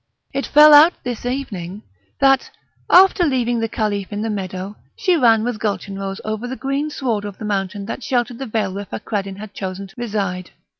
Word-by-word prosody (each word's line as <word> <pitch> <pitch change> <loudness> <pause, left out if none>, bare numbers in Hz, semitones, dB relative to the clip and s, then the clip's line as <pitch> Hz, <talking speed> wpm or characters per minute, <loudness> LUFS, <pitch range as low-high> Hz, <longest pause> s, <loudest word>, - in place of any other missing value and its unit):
It 275 +1 -2
fell 300 +1 +8
out 310 +4 +8
this 245 -1 -4
evening 210 -7 -5 0.3
that, 270 -1 +3 0.4
after 370 0 +6
leaving 245 -6 +1
the 225 0 -1
Caliph 205 -3 -2
in 205 +1 -3
the 225 - -2
meadow, 190 0 -5 0.2
she 370 -3 +2
ran 230 -7 +4
with 240 -2 -2
Gulchenrouz 195 -2 -3
over 215 +2 -3
the 260 - -4
green 275 +3 -2
sward 235 -8 -2
of 205 -2 -7
the 215 - -7
mountain 200 -1 -2
that 230 - -5
sheltered 245 -1 -1
the 270 - -5
vale 215 -4 -1
where 200 +1 -5
Fakreddin 200 -2 -4
had 210 0 -9
chosen 190 0 -5
to 195 - -16
reside. 200 -6 -3
215 Hz, 190 wpm, -20 LUFS, 200-260 Hz, 0.4 s, fell